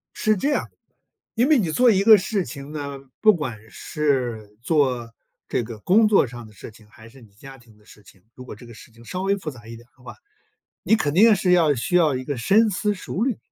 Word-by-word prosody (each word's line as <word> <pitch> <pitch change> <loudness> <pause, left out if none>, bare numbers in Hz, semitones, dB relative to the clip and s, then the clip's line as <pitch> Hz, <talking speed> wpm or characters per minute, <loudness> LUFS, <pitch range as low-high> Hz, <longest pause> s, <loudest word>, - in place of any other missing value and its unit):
是 215 0 +1
这 275 +9 -1
样， - - -2 0.7
因 245 +3 +2
为 310 -1 +4
你 175 -7 -1
做 245 +8 +4
一 195 -2 +1
个 220 0 +8
事 195 -1 -2
情 140 -1 -10
呢， 140 -2 -6 0.2
不 215 -1 +6
管 130 -9 -5
是 120 -10 -3
做 125 -4 -1 0.3
这 120 - -2
个 110 -1 -9
工 210 - +3
作 205 -10 +3
上 120 0 -10
的 105 - -18
事 105 - -12
情， 110 -1 -20
还 110 +1 -16
是 130 +2 -18
你 110 -3 -19
家 135 +6 -13
庭 115 -4 -22
的 105 - -26
事 105 - -18
情。 95 -1 -21
如 130 - -12
果 125 - -10
这 115 - -15
个 120 - -13
事 115 - -16
情 115 +1 -18
稍 185 +8 -5
微 200 +1 0
复 175 -5 -6
杂 120 -4 -15
一 115 - -9
点 120 +1 -16
的 125 - -23
话， 120 - -11 0.7
你 220 - +3
肯 145 -9 -2
定 215 +5 +6
是 185 -1 +1
要 165 -5 +3
需 130 +8 -4
要 160 -5 +3
一 130 - -6
个 140 +1 -4
深 210 - +2
思 210 +2 -1
熟 185 +1 -5
虑， 250 -3 -1
140 Hz, 260 characters per minute, -22 LUFS, 115-195 Hz, 0.7 s, 个